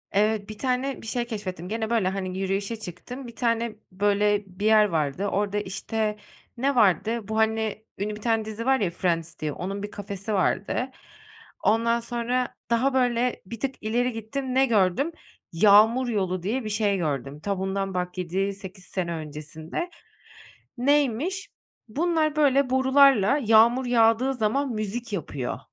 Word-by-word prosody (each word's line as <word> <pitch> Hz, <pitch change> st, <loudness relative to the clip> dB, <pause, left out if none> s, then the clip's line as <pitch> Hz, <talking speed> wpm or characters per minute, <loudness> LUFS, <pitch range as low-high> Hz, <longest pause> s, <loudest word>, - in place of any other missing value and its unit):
Evet, 210 Hz, 0 st, +1 dB
1 215 Hz, -, -7 dB
tane 260 Hz, +2 st, -1 dB
bir -, -, -9 dB
şey 240 Hz, +1 st, -1 dB
keşfettim, 185 Hz, -6 st, -5 dB
gene 220 Hz, 0 st, -2 dB
böyle, 225 Hz, -5 st, +2 dB
hani, 185 Hz, -1 st, -4 dB
yürüyüşe 195 Hz, +3 st, -1 dB
çıktım, 240 Hz, +8 st, -8 dB
1 235 Hz, -, -11 dB
tane, 230 Hz, -2 st, 0 dB, 0.2 s
böyle, 205 Hz, +2 st, +2 dB
bir 190 Hz, +2 st, -6 dB
yer 215 Hz, -1 st, +6 dB
vardı, 165 Hz, 0 st, -1 dB
orada, 205 Hz, +1 st, -1 dB
işte, 210 Hz, +2 st, -2 dB, 0.4 s
ne 275 Hz, +3 st, +1 dB
vardı, 220 Hz, +1 st, +2 dB
bu, 220 Hz, 0 st, -2 dB
hani, 220 Hz, -1 st, 0 dB
ünlü 210 Hz, +2 st, -3 dB
bir 210 Hz, -, -11 dB
tane 225 Hz, -1 st, +1 dB
dizi 220 Hz, +1 st, -5 dB
var 265 Hz, 0 st, +3 dB
ya 195 Hz, -, +1 dB
Friends 170 Hz, -2 st, -2 dB
diye, 155 Hz, -1 st, -2 dB
onun 195 Hz, +5 st, -5 dB
bir 205 Hz, -, -5 dB
kafesi 200 Hz, +1 st, -5 dB
vardı. 205 Hz, +6 st, 0 dB, 0.7 s
Ondan 230 Hz, +2 st, +3 dB
sonra 240 Hz, +1 st, -2 dB
daha 245 Hz, +4 st, +2 dB
böyle 245 Hz, -1 st, +1 dB
bir 225 Hz, +4 st, -8 dB
tık 270 Hz, +1 st, -2 dB
ileri 240 Hz, +3 st, 0 dB
gittim, 255 Hz, +4 st, -4 dB
ne 265 Hz, +1 st, +5 dB
gördüm? 220 Hz, -, +2 dB, 0.4 s
"Yağmur 215 Hz, +8 st, +5 dB
yolu" 185 Hz, -5 st, -1 dB
diye 235 Hz, +7 st, -1 dB
bir -, -, -3 dB
şey 205 Hz, -2 st, +1 dB
gördüm, 145 Hz, -4 st, -3 dB
ta 200 Hz, +1 st, -2 dB
bundan 195 Hz, 0 st, -2 dB
bak 180 Hz, 0 st, -3 dB
7-8 190 Hz, +1 st, -3 dB
sene 175 Hz, -3 st, -3 dB
öncesinde. 155 Hz, -, -6 dB, 0.9 s
Neymiş? 290 Hz, -, +1 dB, 0.4 s
Bunlar 310 Hz, +4 st, 0 dB
böyle 280 Hz, -3 st, +3 dB
borularla 265 Hz, -2 st, +5 dB
yağmur 230 Hz, +3 st, +5 dB
yağdığı 240 Hz, +2 st, +3 dB
zaman 255 Hz, +4 st, 0 dB
müzik 215 Hz, +1 st, -4 dB
yapıyor. 145 Hz, -8 st, -3 dB
215 Hz, 155 wpm, -25 LUFS, 195-245 Hz, 0.9 s, yer